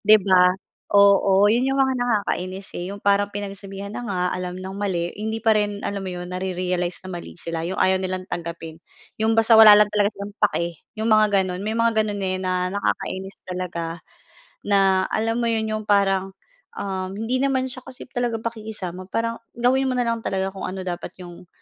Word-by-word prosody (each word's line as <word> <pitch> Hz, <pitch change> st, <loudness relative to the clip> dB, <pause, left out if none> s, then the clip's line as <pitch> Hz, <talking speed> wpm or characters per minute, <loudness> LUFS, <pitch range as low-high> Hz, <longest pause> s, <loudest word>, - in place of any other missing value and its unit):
di 215 Hz, +1 st, +7 dB
ba? 185 Hz, -3 st, +5 dB, 0.4 s
Oo 200 Hz, -1 st, +5 dB
'yon 230 Hz, +4 st, +3 dB
yung 270 Hz, -, 0 dB
mga 265 Hz, -1 st, +3 dB
nakakainis, 195 Hz, -4 st, -2 dB
eh, 175 Hz, +2 st, -4 dB
yung 200 Hz, -, -7 dB
parang 200 Hz, 0 st, +2 dB
pinagsabihan 200 Hz, 0 st, -6 dB
na -, -, -4 dB
nga, 200 Hz, -6 st, -3 dB
alam 180 Hz, 0 st, -5 dB
ng 190 Hz, +1 st, -7 dB
mali 185 Hz, -4 st, -2 dB
hindi 220 Hz, +1 st, -3 dB
pa 225 Hz, -1 st, +3 dB
rin 205 Hz, -1 st, 0 dB
alam 200 Hz, 0 st, -3 dB
mo 190 Hz, -, -5 dB
'yon 180 Hz, 0 st, -6 dB
nare-realize 180 Hz, -1 st, -2 dB
na 185 Hz, -1 st, -6 dB
mali 175 Hz, -, -8 dB
sila. 165 Hz, -1 st, -4 dB
Yung 180 Hz, +3 st, -4 dB
ayaw 185 Hz, 0 st, +3 dB
nilang 185 Hz, 0 st, -3 dB
tanggapin. 165 Hz, -2 st, -6 dB, 0.4 s
Yung 220 Hz, +1 st, +2 dB
basta 225 Hz, +1 st, +5 dB
wala 220 Hz, -2 st, +10 dB
lang 210 Hz, -, +6 dB
talaga 205 Hz, -1 st, +3 dB
silang 200 Hz, +1 st, -7 dB
pake, 170 Hz, -6 st, 0 dB, 0.2 s
yung 220 Hz, -, -1 dB
mga 215 Hz, -1 st, +5 dB
gano'n. 180 Hz, 0 st, -4 dB
May 220 Hz, +2 st, -2 dB
mga 230 Hz, -1 st, +3 dB
gano'n, 205 Hz, -1 st, -3 dB
eh, 185 Hz, 0 st, -1 dB
na 185 Hz, 0 st, -1 dB
nakakainis 195 Hz, -1 st, -3 dB
talaga 170 Hz, -2 st, -4 dB, 0.7 s
na 195 Hz, -2 st, +3 dB
alam 225 Hz, +1 st, 0 dB
mo 235 Hz, -, +1 dB
'yon 225 Hz, -1 st, 0 dB
yung 215 Hz, 0 st, -3 dB
parang, 195 Hz, -2 st, +2 dB, 0.4 s
uhm, 190 Hz, -1 st, -4 dB
hindi 230 Hz, +4 st, -1 dB
naman 270 Hz, -1 st, +1 dB
siya 255 Hz, -, -1 dB
kasi 255 Hz, -, -9 dB
talaga 245 Hz, -2 st, -1 dB
pakikisama. 210 Hz, -6 st, -5 dB
Parang 230 Hz, +2 st, -2 dB, 0.2 s
gawin 260 Hz, +3 st, +2 dB
mo 255 Hz, -, 0 dB
na 245 Hz, -, +1 dB
lang 230 Hz, -1 st, -1 dB
talaga 190 Hz, -2 st, -2 dB
kung 190 Hz, -1 st, -5 dB
ano 185 Hz, 0 st, -5 dB
dapat 175 Hz, -1 st, -5 dB
yung 175 Hz, 0 st, -12 dB
200 Hz, 195 wpm, -23 LUFS, 185-220 Hz, 0.7 s, wala